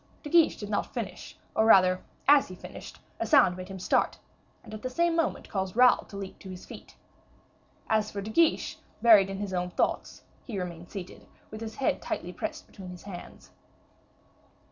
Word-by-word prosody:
De 295 - -7
Guiche 335 -2 +5
did 205 - -6
not 205 - -1
finish, - - -6 0.2
or 220 - +4
rather 185 -4 +6 0.3
as 285 0 +6
he 185 - -9
finished, - - -10 0.2
a - - -1
sound 270 - +5
made 185 0 -7
him 195 0 -7
start, 185 - +1 0.5
and - - -12
at 215 - -7
the 255 - -3
same 340 +6 +1
moment 330 -1 -1
caused 190 -1 -3
Raoul 250 +1 +5
to 200 - -10
leap 195 -1 -7
to 190 - -10
his 185 0 -9
feet. - - -12 0.9
As 215 -1 +1
for 205 - -5
De 205 +2 -5
Guiche, 330 +7 +2 0.2
buried 210 -5 +7
in 195 - -4
his 200 -1 -4
own 180 0 -1
thoughts, - - -2 0.2
he 225 -6 -6
remained 175 -2 -6
seated, 190 -3 -9 0.2
with 215 +1 -8
his 220 -1 -6
head 270 - 0
tightly - - -4
pressed - - -5
between 190 -3 -11
his 180 -1 -10
hands. 190 -3 -10
200 Hz, 190 wpm, -28 LUFS, 185-230 Hz, 0.9 s, buried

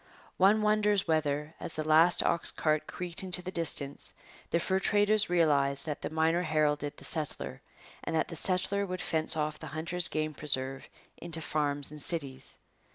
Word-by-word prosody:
One 210 +3 +5
wonders 210 -2 +2
whether, 150 -1 0
as - - -6
the 155 - -2
last 160 +3 +5
ox 170 - +1
cart 155 -1 0
creaked 175 -1 -4
into 180 -1 -1
the 185 - -5
distance, 150 -5 -2 0.4
the 170 - +2
fur 190 +3 0
traders 205 +1 +3
realized 145 -5 +3
that 150 -2 -4
the - - -3
miner 160 +2 +2
heralded 150 -3 0
the - - -8
settler, 70 - -4 0.4
and - - -2
that 160 - +1
the 165 - -7
settler 190 +4 0
would 185 0 -4
fence 160 0 +2
off 150 0 -2
the 160 - -8
hunter's 165 +4 +1
game 155 0 -2
preserve 135 -3 -3 0.3
into 165 -1 -2
farms 145 -2 -1
and 150 -1 -8
cities. 140 -5 -2
160 Hz, 170 wpm, -30 LUFS, 150-180 Hz, 0.4 s, One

